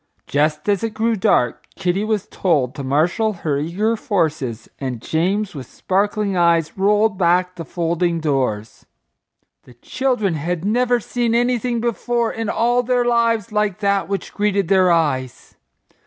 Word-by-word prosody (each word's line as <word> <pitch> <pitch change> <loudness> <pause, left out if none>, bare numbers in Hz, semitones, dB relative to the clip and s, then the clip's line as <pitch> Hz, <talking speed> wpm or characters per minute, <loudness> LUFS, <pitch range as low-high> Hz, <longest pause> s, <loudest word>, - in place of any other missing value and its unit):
Just 150 +3 0
as 200 -1 +1
it 225 -1 -3
grew 225 +1 +1
dark 125 - +1
Kitty 190 +1 -1
was 215 -2 -1
told 140 -9 0
to 140 - -6
marshal 170 +11 +1
her 150 -6 -2
eager 195 +9 0
forces 155 - -2
and 130 -4 -4
James 185 - -1
with 135 -5 -8
sparkling 200 +1 -1
eyes 170 -2 +2
rolled 205 +1 +2
back 180 +1 +2
the 170 - -7
folding 170 +1 -1
doors. 130 -8 -2 0.8
The 125 - -17
children 245 - -1
had 165 +3 -3
never 245 +3 +2
seen 235 +1 -1
anything 240 -1 0
before 235 0 -1
in 225 -1 -3
all 240 +2 +2
their 245 0 +1
lives 230 -3 +1
like 210 -3 0
that 200 -1 +1
which 200 -1 -4
greeted 200 -3 0
their 185 -2 +4
eyes. 140 -7 -1
190 Hz, 150 wpm, -20 LUFS, 160-220 Hz, 0.8 s, their